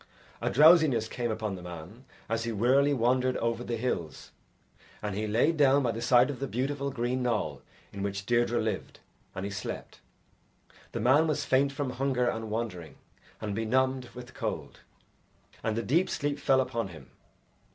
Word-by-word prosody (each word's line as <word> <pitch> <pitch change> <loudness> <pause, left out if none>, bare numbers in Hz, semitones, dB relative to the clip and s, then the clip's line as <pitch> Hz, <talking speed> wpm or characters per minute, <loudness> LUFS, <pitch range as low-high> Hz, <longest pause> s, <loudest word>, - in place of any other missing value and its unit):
A - - 0
drowsiness 150 -6 +6
came 120 0 -3
upon 110 -2 -2
the 90 - -7
man 90 +8 -10 0.2
as 115 0 -1
he 115 - -2
wearily 130 +7 +3
wandered 130 0 +2
over 115 +1 -1
the 120 -1 -3
hills, 85 - -3 0.7
and 105 -1 -4
he 105 +2 -2
laid 125 +10 +2
down 140 -1 +5
by 120 - +1
the 115 +1 -5
side 125 +3 +4
of 135 - -8
the 140 - -2
beautiful 140 +3 -2
green 125 0 -1
knoll 105 - -1 0.3
in 100 - -6
which 100 0 -3
Deirdre 120 +1 +2
lived, 110 0 -3 0.4
and 95 - -4
he 100 - -4
slept. 95 -2 -6 0.9
The - - -2
man 140 +7 +4
was 150 -2 -1
faint 135 +1 +3
from 140 -1 -3
hunger 125 -1 0
and 110 -2 -2
wandering, 105 -7 -4 0.4
and 105 -2 -3
benumbed 130 +3 0
with 125 +1 -10
cold, - - -5 0.8
and 110 0 -1
a 115 - -1
deep 165 - +2
sleep 145 -1 -2
fell 135 -2 +3
upon 115 -4 -2
him. 85 -4 -13
120 Hz, 170 wpm, -29 LUFS, 110-135 Hz, 0.9 s, drowsiness